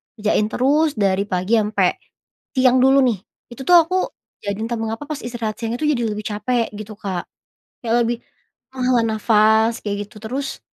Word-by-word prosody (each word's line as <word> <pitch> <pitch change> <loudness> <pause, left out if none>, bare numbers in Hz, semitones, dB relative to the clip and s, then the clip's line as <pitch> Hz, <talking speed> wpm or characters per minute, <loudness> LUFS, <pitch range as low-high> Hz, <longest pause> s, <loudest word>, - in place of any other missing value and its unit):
kerjain 210 -1 +1
terus 290 +6 +2
dari 200 -2 +1
pagi 185 +4 +1
ampe, 210 0 +1 0.6
siang 255 -1 +4
dulu 270 +1 +6
nih 235 -6 +1 0.3
itu 240 - -9
tuh 360 - +7
aku 335 +3 0 0.5
jadi 200 0 -2
entah 235 +1 -2
mengapa 225 +4 -3
pas 300 -1 -5
istirahat 230 -3 -4
siangnya 230 +1 -2
itu 305 - 0
jadi 240 - -1
lebih 210 0 -5
capek 230 +3 -1
gitu 215 +1 -8
Kak, 185 -3 -4 0.6
kayak 230 0 +1
lebih, 235 +1 0 0.6
menghela 250 -2 +2
nafas 220 +1 +3
kayak 205 -1 -2
gitu 210 - -16
terus, 270 +5 -4
225 Hz, 170 wpm, -21 LUFS, 210-255 Hz, 0.6 s, tuh